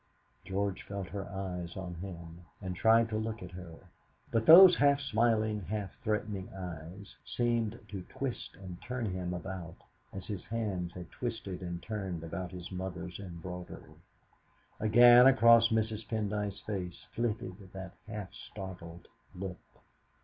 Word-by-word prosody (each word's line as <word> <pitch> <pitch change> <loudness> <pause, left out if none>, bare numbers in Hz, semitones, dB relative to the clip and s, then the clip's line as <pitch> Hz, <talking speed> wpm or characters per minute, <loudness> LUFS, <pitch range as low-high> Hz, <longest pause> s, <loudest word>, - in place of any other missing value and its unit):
George 100 0 -2
felt 100 -3 -6
her 100 -1 -5
eyes 90 -3 -5
on 95 -2 -5
him, 85 -1 -8 0.2
and 95 -2 -4
tried 115 +4 +5
to 110 - -1
look 110 -2 -4
at 90 - -8
her, 90 -2 -9 0.6
but 115 -1 +1
those 175 +2 +11
half 140 -1 +5
smiling, 110 -4 +1
half 100 0 -3
threatening 105 -3 -2
eyes 90 +1 -8
seemed 115 -2 0
to 100 -2 -6
twist 135 -3 -4
and 90 -2 -9
turn 125 -1 -3
him 90 -3 -3
about 90 -1 -5 0.4
as 95 -1 -7
his 100 -4 -5
hands 100 -6 -2
had 90 -2 -9
twisted 115 -7 -4
and 85 -1 -5
turned 95 -6 -4
about 90 +2 -4
his 90 0 -8
mother's 90 -1 -5
embroidery. 90 -1 -8 0.8
Again 120 +3 +8
across 115 -3 +7
Mrs. 110 -1 -1
Pendyce's 105 -2 -2
face 90 -4 -5
flitted 105 -5 -3
that 95 -2 -7
half 105 -3 -6
startled 90 -4 -9 0.3
look. 90 -1 -5
95 Hz, 140 wpm, -32 LUFS, 90-110 Hz, 0.8 s, those